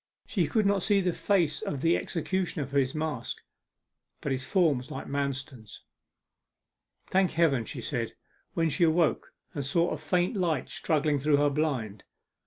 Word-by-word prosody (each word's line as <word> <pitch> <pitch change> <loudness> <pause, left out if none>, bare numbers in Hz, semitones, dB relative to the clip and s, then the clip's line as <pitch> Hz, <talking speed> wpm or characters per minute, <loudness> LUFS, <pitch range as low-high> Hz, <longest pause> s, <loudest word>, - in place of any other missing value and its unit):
She 180 -7 0
could 215 +7 +1
not 200 -1 +3
see 205 +1 +3
the 180 -2 +1
face 175 -7 +1
of 140 - -3
the 165 +2 +4
executioner 175 -2 -2
for 140 +2 +1
his 130 +1 0
mask, 155 -6 -3 0.8
but - - -3
his 135 0 -2
form 160 -6 +3
was 125 - -11
like - - -6
Manston's. 135 -5 -4 1.2
'Thank 190 -1 +2
Heaven!' 145 -8 +2
she - - -6
said, - - -3 0.4
when 165 -1 +2
she 175 - +1
awoke 165 0 +2 0.2
and 145 - -3
saw 170 +6 +1
a 155 - -3
faint 175 +7 0
light 170 -8 0
struggling 150 -2 +1
through 145 +1 +3
her 145 0 +3
blind. 130 -9 -2
155 Hz, 165 wpm, -28 LUFS, 140-175 Hz, 1.2 s, the